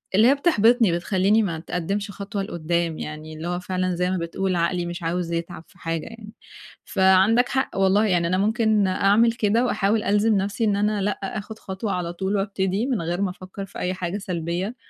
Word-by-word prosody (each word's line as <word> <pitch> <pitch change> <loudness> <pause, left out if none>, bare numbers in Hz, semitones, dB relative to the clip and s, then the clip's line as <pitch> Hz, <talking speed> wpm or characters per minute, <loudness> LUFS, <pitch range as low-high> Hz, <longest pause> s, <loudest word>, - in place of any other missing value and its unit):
اللي 215 +4 +6
هي 275 - +5
بتحبِطني 240 - +3
بتخلّيني 190 +5 +2
ما 180 -5 -2
اتقدِّمش 195 +5 -3
خطوة 200 0 -4
لقُدّام 170 -2 -2
يعني 155 +1 -7
اللي 155 +2 -6
هو 175 0 -2
فعلًا 185 0 -2
زَي 180 +1 0
ما 185 - 0
بتقول 180 +2 -2
عقلي 175 +1 0
مش 175 0 -6
عاوز 170 +1 -2
يتعب 170 -1 -4
في - - -23
حاجة 165 -1 -3
يعني، 225 -2 -11 0.5
فعندك 190 +5 +4
حق 265 -6 -1
والله 195 +2 +3
يعني 175 -4 +2
أنا 185 +2 +1
ممكن 215 0 +2
أعمل 205 +5 +3
كده 230 +1 +1
وأحاول 210 -2 +1
ألزِم 210 +2 +2
نَفْسي 200 +4 -2
إن 205 -2 +2
أنا 205 0 0
لأ 205 +1 -1 0.2
آخد 215 +1 -7
خطوة 190 +2 -4
على 175 -1 -3
طُول 190 +3 -2
وأبتدي 195 +1 -1
من 255 -8 -1
غير 175 +3 -2
ما 200 - +1
أفكّر 185 +2 -8
في 195 - -10
أي 180 - -1
حاجة 185 +1 -3
سلبية، 180 +2 -3
195 Hz, 195 wpm, -23 LUFS, 175-210 Hz, 0.5 s, اللي